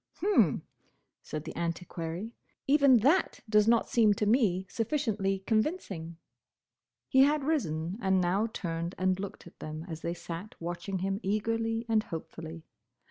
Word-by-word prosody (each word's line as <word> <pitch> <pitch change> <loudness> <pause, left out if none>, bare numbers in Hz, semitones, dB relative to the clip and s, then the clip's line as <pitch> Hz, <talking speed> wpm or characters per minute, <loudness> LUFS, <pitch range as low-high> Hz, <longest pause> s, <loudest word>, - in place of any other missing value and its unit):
"H'm!" 405 +3 +3 0.6
said 155 -1 -5
the 160 - -7
Antiquary. 170 +4 -4 0.3
"Even 280 -2 +6
that 305 - +2
does 210 0 +4
not 230 0 +4
seem 215 -4 +4
to 210 - 0
me 205 -5 +2
sufficiently 215 -6 -1
convincing." 215 - -1 0.9
He 265 - +3
had 290 +1 +4
risen, 185 - -1
and 190 -2 +3
now 185 +5 +1
turned 170 -3 -3
and 185 0 +1
looked 200 -1 -6
at 170 - -15
them 155 +1 -6
as 160 -2 -6
they 170 +1 -2
sat 175 +4 -7
watching 175 +3 -4
him 195 +1 -1
eagerly 225 +3 -1
and 220 -1 +3
hopefully. 165 -2 -7
195 Hz, 140 wpm, -30 LUFS, 170-225 Hz, 0.9 s, Even